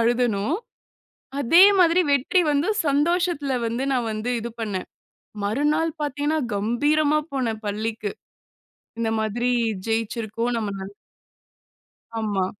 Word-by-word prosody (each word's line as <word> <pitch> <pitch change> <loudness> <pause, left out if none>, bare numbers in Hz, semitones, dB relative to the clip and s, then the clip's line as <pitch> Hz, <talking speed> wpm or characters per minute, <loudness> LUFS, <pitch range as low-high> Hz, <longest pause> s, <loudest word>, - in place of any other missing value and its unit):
அழுதனோ, 235 -4 +1 0.9
அதே 330 +8 +7 0.2
மாதிரி 350 0 +5
வெற்றி 280 +7 +3
வந்து, 290 +7 +1 0.2
சந்தோஷத்தல 295 -1 +1
வந்து 235 +3 -2
நான் 245 -3 0
வந்து, 215 +3 -2
இது 235 - -5
பண்ணேன். 200 -4 -3 0.6
மறுநாள் 295 +9 +1
பாத்தீங்கன்னா, 290 +2 -1 0.2
கம்பீரமா 290 +9 +2
போனேன் 235 -5 -2
பள்ளிக்கு. 215 0 -3 0.9
இந்த 225 -1 0
மாதிரி 235 +3 0 0.4
ஜெயிச்சிருக்கோம், 225 +1 -1
நம்ம 210 -3 -2
ந - - -5 1.4
ஆமா. 205 -4 0
240 Hz, 105 wpm, -24 LUFS, 220-295 Hz, 1.4 s, அதே